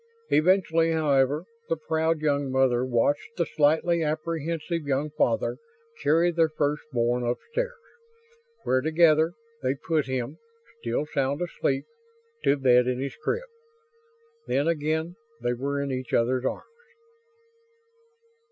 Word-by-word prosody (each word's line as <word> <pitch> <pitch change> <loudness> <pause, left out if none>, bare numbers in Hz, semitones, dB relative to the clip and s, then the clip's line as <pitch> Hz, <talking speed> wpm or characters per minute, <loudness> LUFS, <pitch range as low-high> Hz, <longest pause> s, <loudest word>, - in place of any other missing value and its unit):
Eventually, 165 -1 +3
however, 145 0 +2 0.2
the 165 - +1
proud 160 0 0
young 145 -3 0
mother 130 -2 +3
watched 130 - 0
the 170 - +1
slightly 160 +3 +2
apprehensive 165 +1 -2
young 140 +2 0
father 275 - 0 0.4
carry 165 +4 +3
their 165 -1 +2
first 150 -1 -1
born 120 0 +1
upstairs; 480 - -2 0.9
where 130 0 +2
together, 160 +1 +4 0.3
they 130 +2 0
put 155 0 -1
him 130 +3 -3 0.4
still 120 - -1
sound 140 -1 -1
asleep 135 -5 -1 0.6
to 140 - +3
bed 125 -2 +4
in 125 0 0
his 135 0 -4
crib. 475 - -2 1.0
Then 140 +3 +1
again 160 +2 -1 0.2
they 120 - 0
were 140 +3 -2
in 140 -1 -2
each 130 -1 -2
other's 125 +2 +1
arms. 475 - -6
150 Hz, 125 wpm, -26 LUFS, 130-165 Hz, 1.0 s, together